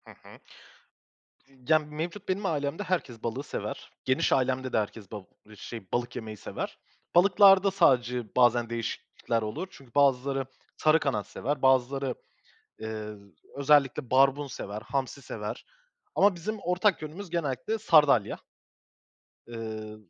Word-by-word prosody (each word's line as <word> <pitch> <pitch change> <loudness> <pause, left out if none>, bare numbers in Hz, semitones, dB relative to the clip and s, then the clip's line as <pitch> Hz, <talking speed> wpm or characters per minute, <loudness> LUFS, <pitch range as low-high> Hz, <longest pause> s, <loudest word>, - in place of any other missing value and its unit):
Hı - - -12
hı. - - -17 1.1
Ya, 135 +4 +1
mevcut 160 +6 -6
benim 195 +2 -1
ailemde 150 +2 -1
herkes 165 - -3
balığı 120 +4 -3
sever. - - -6
Geniş 130 +1 +2
ailemde 130 0 0
de - - +3
herkes 105 -1 -5
bal 105 -3 -6 0.3
şey, 110 0 -9
balık 120 0 -1
yemeyi 110 -2 -6
sever. - - -6 0.4
Balıklarda 195 +1 +6
sadece 125 - +2
bazen 120 -1 +4
değişiklikler 115 0 -3
olur. 110 - -4
Çünkü 135 -3 -16
bazıları 135 -1 +2 0.3
sarı 155 +1 +4
kanat 110 -10 -1
sever, 140 +5 -3
bazıları, 130 0 +2 0.6
eee, 110 -1 -5 0.4
özellikle 140 -2 +3
barbun 135 +2 +4
sever, 105 -5 -6
hamsi 135 +3 -3
sever - - -6 0.5
ama 200 0 +4
bizim 215 +6 -4
ortak 180 0 +1
yönümüz 165 +5 -7
genellikle 165 - -2
sardalya. 150 - +4 1.1
Eee, 110 -2 -6
135 Hz, 125 wpm, -28 LUFS, 120-160 Hz, 1.1 s, Balıklarda